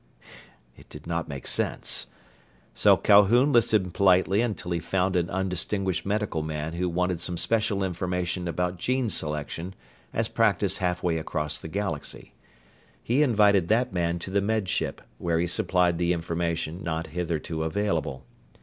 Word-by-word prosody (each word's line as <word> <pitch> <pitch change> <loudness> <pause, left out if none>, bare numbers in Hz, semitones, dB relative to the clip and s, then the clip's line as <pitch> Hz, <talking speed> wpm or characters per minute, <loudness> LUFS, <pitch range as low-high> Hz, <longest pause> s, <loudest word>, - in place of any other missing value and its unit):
It - - -18
did 75 - -11
not 85 -1 -2
make 70 -3 -7
sense. - - 0 0.7
So - - +5
Calhoun 115 +8 +5
listened 110 -6 +3
politely 95 +1 +4
until 105 -7 -3
he 85 - 0
found 90 +2 0
an 90 0 +1
undistinguished 95 0 -1
medical 105 -5 -1
man 75 0 -4
who 90 +1 -1
wanted 90 0 -1
some 85 0 -1
special 110 -1 +1
information 90 -1 -2
about 90 +1 -2
gene 125 +1 0
selection 75 +5 -3 0.4
as - - -1
practised - - +1
halfway 90 -2 0
across 75 -1 -2
the - - -8
galaxy. 95 -4 -4 0.7
He 125 +5 +2
invited 105 - +4
that 120 +4 +1
man 85 -1 0
to 90 +2 -7
the 100 +1 +2
Med 110 -1 0
Ship, - - -2 0.2
where 85 -1 0
he 85 - +1
supplied 90 0 +1
the 85 0 +2
information 85 0 -2
not 80 -2 -2
hitherto 80 -2 -3
available. 80 -6 -2
90 Hz, 150 wpm, -26 LUFS, 85-100 Hz, 0.7 s, So